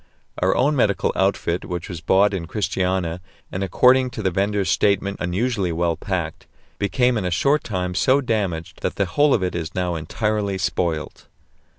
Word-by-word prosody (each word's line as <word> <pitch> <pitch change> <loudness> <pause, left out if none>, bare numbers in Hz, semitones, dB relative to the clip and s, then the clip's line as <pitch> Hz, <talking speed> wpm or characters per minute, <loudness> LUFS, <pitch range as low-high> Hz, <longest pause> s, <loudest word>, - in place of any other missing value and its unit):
Our - - +2
own 145 +4 +2
medical 100 -7 +1
outfit, 95 -2 0
which 90 -2 -5
was 85 -4 -7
bought 100 +2 +3
in 85 -4 -3
Christiania, 90 -3 -1 0.3
and 95 - -3
according 125 +6 +4
to 110 - -5
the 95 - +1
vendor's 100 +1 0
statement 100 -1 +1
unusually 95 +1 -1
well 85 0 0
packed, 85 -5 -4 0.3
became 125 +3 +2
in 95 - -3
a - - 0
short 140 - +2
time 90 -4 -3
so 130 +8 +3
damaged 100 - -2
that - - -2
the 100 - +1
whole 145 +11 +2
of 105 - +2
it 90 - -1
is 80 -1 -4
now 90 -1 0
entirely 100 +5 -1
spoilt. 85 -4 -2
95 Hz, 175 wpm, -22 LUFS, 90-105 Hz, 0.3 s, according